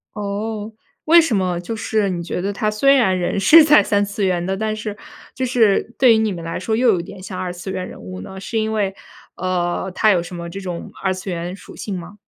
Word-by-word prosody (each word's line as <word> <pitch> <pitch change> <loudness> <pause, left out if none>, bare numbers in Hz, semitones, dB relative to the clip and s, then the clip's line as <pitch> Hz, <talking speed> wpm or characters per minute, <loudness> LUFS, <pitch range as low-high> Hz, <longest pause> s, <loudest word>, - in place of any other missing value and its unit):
哦， 210 +1 -4 0.3
为 335 +2 +7
什 315 -10 +1
么 180 -2 0
就 225 +6 -5
是 215 -2 0
你 175 -2 -3
觉 170 - -4
得 200 +3 -2
他 215 +1 -1
虽 275 +6 +4
然 190 -9 +3
人 180 +2 -1
是 305 - +8
在 300 0 +6
三 205 0 +1
次 200 0 -3
元 180 -2 0
的， 190 +1 -1
但 215 +1 -1
是 210 -1 -5 0.4
就 260 - -2
是 235 -2 +2
对 255 -3 +6
于 - - +3
你 220 -2 +1
们 170 -2 -6
来 165 - -4
说 220 +4 -2
又 245 +2 +3
有 190 -6 +3
点 185 +2 -9
像 185 -1 -7
二 185 -1 -3
次 180 +2 -7
元 185 -1 -3
人 - - -11
物 90 0 -8
呢？ 190 - -9
是 225 +3 -3
因 220 0 -1
为， 200 -3 0 0.4
呃， 180 0 -1
他 215 - +4
有 180 -3 +3
什 175 +1 -9
么 170 -1 -6
这 195 +3 -6
种 180 -3 -6
二 190 - +1
次 185 +1 -6
元 175 +1 -4
属 - - -13
性 195 -3 -4
吗？ 175 +4 -11
195 Hz, 270 characters per minute, -20 LUFS, 180-220 Hz, 0.4 s, 是